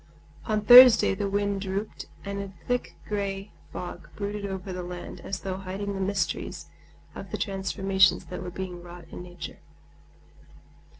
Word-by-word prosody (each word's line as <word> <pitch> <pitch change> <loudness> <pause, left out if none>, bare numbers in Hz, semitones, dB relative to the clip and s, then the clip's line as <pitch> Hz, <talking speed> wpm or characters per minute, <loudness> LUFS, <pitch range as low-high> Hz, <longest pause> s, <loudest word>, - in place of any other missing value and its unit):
On 215 -1 0
Thursday 245 0 +9
the 200 0 -2
wind 200 0 0
dropped, 195 +2 -4 0.2
and 200 0 -3
a 200 -1 -7
thick 245 0 -1
gray 200 -1 -3 0.2
fog 175 - -7
brooded 205 0 -3
over 190 -1 -5
the 180 - -4
land 175 0 -7
as 195 -1 -5
though 190 -1 -3
hiding 195 +1 -4
the 195 - -4
mysteries 195 +1 -2 0.5
of - - -8
the - - -3
transformations 195 -2 +2
that 180 - -7
were 180 - -5
being 180 -1 -6
wrought 175 -1 -11
in - - -7
nature. 175 -1 -9
195 Hz, 155 wpm, -27 LUFS, 185-200 Hz, 0.5 s, Thursday